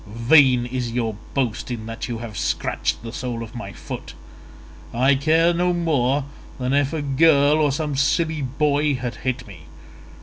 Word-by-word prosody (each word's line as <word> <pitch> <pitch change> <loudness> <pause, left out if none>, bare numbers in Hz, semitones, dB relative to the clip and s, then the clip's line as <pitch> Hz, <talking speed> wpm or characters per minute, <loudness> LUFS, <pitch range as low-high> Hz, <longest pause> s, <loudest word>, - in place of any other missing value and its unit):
Vain 120 +3 +4
is 125 -1 -3
your 115 -3 -1 0.2
boast 130 -5 -1
in 115 -3 -5
that 115 +1 -5
you 120 -2 -4
have 115 -2 -8
scratched - - -2
the 115 0 -7
sole 120 -2 -4
of 110 - -10
my 115 -5 -7
foot. - - -8 0.8
I 130 +4 +3
care 160 +5 +3
no 180 +1 +1
more 145 -5 +1 0.3
than 130 0 -1
if 140 -1 +2
a 155 -2 -3
girl 145 +1 +4
or 150 -2 +3
some 150 0 -2
silly 155 +3 +1
boy 145 +2 +1
had 120 -4 -5
hit 130 +1 -3
me. 85 -6 -13
130 Hz, 170 wpm, -22 LUFS, 120-150 Hz, 0.8 s, Vain